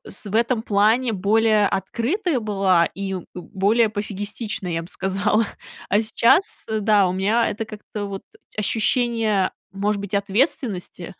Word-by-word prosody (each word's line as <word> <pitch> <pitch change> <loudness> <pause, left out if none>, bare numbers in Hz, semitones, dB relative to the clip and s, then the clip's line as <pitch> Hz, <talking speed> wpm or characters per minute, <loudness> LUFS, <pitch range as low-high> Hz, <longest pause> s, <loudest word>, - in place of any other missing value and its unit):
с - - -3
в 200 - -6
этом 235 0 +1
плане 220 +4 +2
более 210 +1 +3
открытая 255 - -1
была 195 -5 +2
и 195 -1 -3 0.2
более 210 +5 +1
пофигистичная, 205 -2 -4
я 165 0 -2
бы 170 - -11
сказала. 200 +4 0 0.4
А 205 - +3
сейчас, 235 - +2
э, 220 0 -1
да, 205 -2 +4
у 180 - -1
меня 210 +5 +1
это 225 - -4
как-то, 215 -1 -7
вот, 195 -1 -6 0.3
ощущение, 220 -2 +1 0.2
может 200 +1 -1
быть, 200 0 -6
ответственности 200 - -1
210 Hz, 140 wpm, -22 LUFS, 195-225 Hz, 0.4 s, да